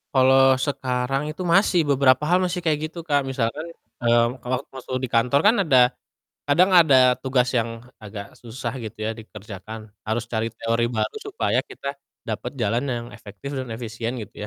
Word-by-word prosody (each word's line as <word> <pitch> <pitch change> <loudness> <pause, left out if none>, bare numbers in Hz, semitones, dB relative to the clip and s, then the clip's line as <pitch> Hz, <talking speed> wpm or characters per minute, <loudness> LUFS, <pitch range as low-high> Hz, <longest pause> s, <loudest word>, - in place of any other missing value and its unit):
Kalau 130 +1 +6 0.3
sekarang 130 0 -1
itu 185 - -8
masih, 190 -2 +4
beberapa 135 0 +4
hal 180 - +5
masih 180 0 -2
kayak 150 -2 +2
gitu 165 +2 -8
Kak. 145 -1 +3
Misalkan, 130 +5 -2 0.4
eee, 120 0 +5 0.2
kalau 125 +1 -1 0.2
masuk 130 0 -6
di 125 - -2
kantor 125 +4 +3
kan 225 - +5
ada 135 -5 +4 0.7
kadang 180 +6 +4
ada 150 -5 +4 0.3
tugas 130 -2 +1
yang 115 0 0 0.3
agak 100 -1 -7 0.2
susah 120 0 -5
gitu 110 - -8
ya 110 - -1
dikerjakan, 110 0 -9 0.3
harus 115 +2 -1
cari 110 0 0
teori 115 +1 0
baru 110 - -1
supaya 415 - 0
kita 140 - -7 0.4
dapat 115 +4 -4
jalan 115 +4 +1
yang 120 0 -4
efektif 105 +5 -9
dan 130 -2 -4
efisien 115 0 -4
gitu 105 - -12
125 Hz, 165 wpm, -23 LUFS, 115-140 Hz, 0.7 s, Kalau